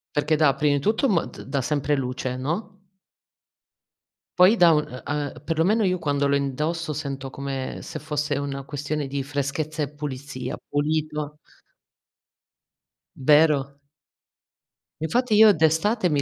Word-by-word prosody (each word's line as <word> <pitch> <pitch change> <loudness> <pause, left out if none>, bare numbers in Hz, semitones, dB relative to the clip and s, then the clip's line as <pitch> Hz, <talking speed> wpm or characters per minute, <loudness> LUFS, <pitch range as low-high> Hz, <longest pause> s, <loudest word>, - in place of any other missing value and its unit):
Perché 150 +2 +2
dà, 150 -3 +4
prima 145 0 +2
di 140 - -1
tutto 220 - +2
mot 185 -8 -1
dà 135 0 -2
sempre 145 +1 0
luce, 125 -1 -3
no? 180 +9 -4 1.6
Poi 185 +5 +7
dà 175 -5 +6
un 150 - +4 0.2
u - - -4
uhm, 145 -4 -3
perlomeno 170 +8 +1
io 185 -2 +1
quando 145 -3 0
lo 140 - +2
indosso 150 +4 -2
sento 135 -2 -5
come, 135 -1 -5
se - - -7
fosse 150 -1 -2
una 140 -1 -4
questione 145 +1 -3
di 135 0 -3
freschezza 145 +2 -3
e 140 - -3
pulizia, 135 -3 -5
pulito 150 0 -1 1.8
Vero? 145 -1 +3 1.2
Infatti 240 +7 +1
io 215 0 +8
d'estate, 180 +5 +2
mi 145 -3 +1
150 Hz, 135 wpm, -24 LUFS, 140-160 Hz, 1.8 s, io